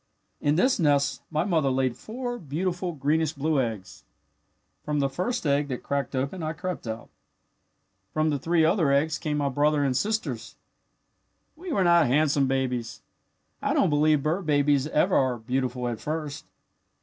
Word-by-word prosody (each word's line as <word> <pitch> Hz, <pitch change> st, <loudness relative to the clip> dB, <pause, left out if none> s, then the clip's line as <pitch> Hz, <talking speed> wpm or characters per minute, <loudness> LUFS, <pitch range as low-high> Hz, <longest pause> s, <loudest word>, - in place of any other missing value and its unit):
"In 145 Hz, +1 st, +1 dB
this 250 Hz, +7 st, +3 dB
nest 145 Hz, -4 st, +2 dB
my 155 Hz, 0 st, 0 dB
mother 165 Hz, -7 st, +1 dB
laid 130 Hz, -2 st, 0 dB
four 245 Hz, -, -5 dB
beautiful 175 Hz, +4 st, -3 dB
greenish 155 Hz, +2 st, 0 dB
blue 145 Hz, 0 st, +1 dB
eggs. 110 Hz, -6 st, -5 dB, 0.8 s
From 150 Hz, -1 st, -1 dB
the 135 Hz, -1 st, 0 dB
first 180 Hz, -, -2 dB
egg 145 Hz, 0 st, +2 dB
that 130 Hz, -3 st, -5 dB
cracked 140 Hz, 0 st, -2 dB
open 140 Hz, +8 st, -2 dB
I 155 Hz, 0 st, -2 dB
crept 180 Hz, -4 st, -5 dB
out. 110 Hz, +1 st, -6 dB, 1.0 s
From 155 Hz, 0 st, +1 dB
the 145 Hz, -, -1 dB
three 165 Hz, +3 st, +2 dB
other 165 Hz, -4 st, +3 dB
eggs 150 Hz, +3 st, +1 dB
came 150 Hz, -1 st, -2 dB
my 145 Hz, -1 st, 0 dB
brother 145 Hz, +2 st, +2 dB
and 135 Hz, -2 st, +1 dB
sisters. 220 Hz, -, -2 dB, 1.0 s
"We 350 Hz, +2 st, -7 dB
were 200 Hz, -9 st, +2 dB
not 170 Hz, -3 st, +5 dB
handsome 140 Hz, +1 st, +2 dB
babies. 125 Hz, -3 st, -2 dB, 0.6 s
I -, -, 0 dB
don't -, -, +3 dB
believe 150 Hz, -1 st, +3 dB
bird 165 Hz, +3 st, -1 dB
babies 145 Hz, -1 st, +3 dB
ever 180 Hz, +5 st, +2 dB
are 130 Hz, -2 st, +2 dB
beautiful 125 Hz, +1 st, -2 dB
at 115 Hz, -3 st, -3 dB
first. 150 Hz, -2 st, -4 dB
150 Hz, 160 wpm, -26 LUFS, 135-165 Hz, 1.0 s, not